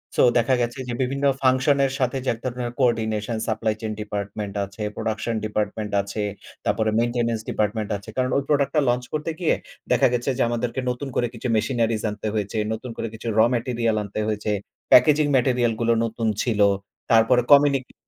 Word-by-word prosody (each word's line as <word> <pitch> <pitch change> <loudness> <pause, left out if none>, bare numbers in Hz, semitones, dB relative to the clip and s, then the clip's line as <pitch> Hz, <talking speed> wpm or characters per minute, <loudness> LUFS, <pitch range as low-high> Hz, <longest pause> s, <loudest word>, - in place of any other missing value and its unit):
So - - +3 0.2
দেখা 120 +2 +3
গেছে 120 +3 -2
যে 120 - -3
বিভিন্ন 135 +2 -1 0.2
ফাংশন 130 +2 +3
এর 135 - -1
সাথে 130 0 0
যে - - +1
এক 115 - -10
ধরনের 125 -1 -3
coordination 110 -3 0
supply 110 -1 0
chain 110 -1 -3
department 105 -1 -4
আছে, 100 +2 -12
'প্রোডাকশন 110 +1 -2
ডিপার্টমেন্ট' 105 0 -2
আছে 100 +2 -4 0.4
তারপরে 110 -1 +1
'maintenance 115 -1 0
department' 105 0 -1
আছে। 100 +2 -12
কারণ 130 0 +1
ওই 140 - 0
প্রোডাক্ট 140 -2 +2
টা 150 - +5
লঞ্চ 125 +1 +1
করতে 155 +2 -2
গিয়ে 175 - +2 0.4
দেখা - - +5
গেছে 120 +2 -1
যে - - 0
আমাদেরকে 120 +2 -2
নতুন 125 +3 -3
করে 120 - +1
কিছু 120 +2 -5
মেশিনারিস 115 0 0
আনতে 105 +1 -5
হয়েছে, 105 +1 -2 0.2
নতুন 120 +2 -6
করে - - -3
কিছু 110 +1 -8
র - - +5
ম্যাটেরিয়াল 115 -2 0
আনতে 105 +1 -5
হয়েছে, 105 0 -1 0.4
প্যাকেজিং 150 +4 +6
ম্যাটেরিয়াল 125 -2 +2
গুলো 115 0 +3
নতুন 115 0 -2 0.2
ছিল। 115 -4 -1 0.5
তারপরে 115 +2 +5
কমিনিকি 140 -2 +5
115 Hz, 180 wpm, -23 LUFS, 110-125 Hz, 0.5 s, প্যাকেজিং